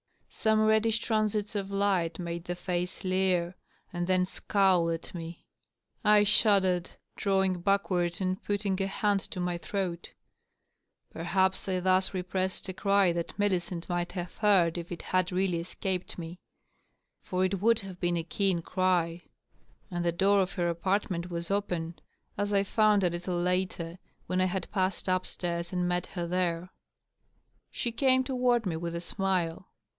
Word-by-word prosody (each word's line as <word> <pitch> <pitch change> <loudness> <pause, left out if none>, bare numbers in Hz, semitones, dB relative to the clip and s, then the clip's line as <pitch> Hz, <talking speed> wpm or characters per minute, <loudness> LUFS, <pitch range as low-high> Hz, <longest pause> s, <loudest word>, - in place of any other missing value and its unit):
Some 220 0 +2
reddish 220 +1 +3
transits 215 -2 0
of 200 -2 -3
light 195 -5 +1
made 170 -1 -5
the 175 - -3
face 180 0 -3
leer 185 -2 +1 0.4
and 175 0 -2
then 185 -1 +3
scowl 185 -3 +2
at 165 0 -4
me. 165 -1 -7 0.6
I 210 0 +6
shuddered, 190 -4 +3 0.3
drawing 190 -2 +1
back 200 +2 +1
ward 175 -1 0
and 185 0 -1
putting 200 -2 -1
a 195 - +1
hand 200 0 +1
to 190 - -7
my 180 -1 -1
throat. 180 -2 -3 1.0
Perhaps 190 +3 0
I 185 -1 +1
thus 185 +1 +2
repressed 185 0 -2
a - - -3
cry 195 -1 +3
that 170 -1 -4
Millicent 180 -4 -1
might 175 0 -2
have 180 -2 -5
heard 180 -5 +3
if 170 +1 -8
it 170 - -6
had 185 0 0
really 180 -2 +1
escaped 185 +1 -4
me. 170 +1 -7 0.8
For 185 -1 0
it 185 0 -1
would 230 +1 +4
have 190 -2 -9
been 175 -1 +1
a 165 - -1
keen 180 0 0
cry; 175 -2 +1 0.7
and 175 -1 -2
the 170 - +2
door 195 +3 +3
of 190 0 -2
her 175 -2 0
apartment 180 0 -1
was 170 +1 -4
open, 175 -5 -2 0.4
as 205 +1 -1
I 200 -1 +3
found 210 0 +3
a 180 - +4
little 175 +1 -2
later, 180 -1 -1 0.3
when 185 0 0
I - - +4
had 185 -1 -3
passed 190 -1 -1
up 185 0 +1
stairs 170 -1 -3
and 180 -1 0
met 180 0 -1
her 175 -2 -4
there. 175 0 -1 1.0
She 235 - -2
came 260 +2 +3
toward 250 -3 +1
me 175 -4 -1
with 170 +1 -4
a 170 - -3
smile. 185 -2 -1
185 Hz, 165 wpm, -29 LUFS, 175-195 Hz, 1.0 s, I